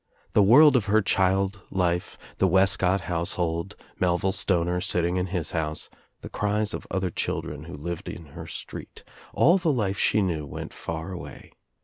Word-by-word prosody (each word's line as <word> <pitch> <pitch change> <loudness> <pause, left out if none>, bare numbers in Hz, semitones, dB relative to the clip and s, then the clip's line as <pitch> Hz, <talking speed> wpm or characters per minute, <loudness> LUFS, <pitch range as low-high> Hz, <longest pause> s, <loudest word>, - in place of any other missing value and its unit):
The - - +5
world 135 +8 +7
of 120 -5 +2
her 110 +1 +3
child 95 +1 +1
life, 90 -2 -1 0.2
the 95 - +4
Wescott 95 0 +3
house 85 -1 -2
hold, 85 +2 -2 0.2
Melville 90 +1 +1
Stoner 90 -2 0
sitting 90 +1 +1
in 90 0 0
his 90 -4 -3
house, 80 -2 -3 0.3
the - - -7
cries 105 0 0
of - - -6
other 95 -2 -1
children 75 -1 -3
who 85 -3 -8
lived 85 +3 -5
in 85 - -8
her - - -8
street, - - -8 0.3
all 175 +6 +4
the 165 -3 +1
life 105 -7 -1
she 105 - +3
knew 85 -5 -1
went - - -7
far 80 +3 -5
away. 90 - -9
95 Hz, 170 wpm, -26 LUFS, 85-100 Hz, 0.3 s, world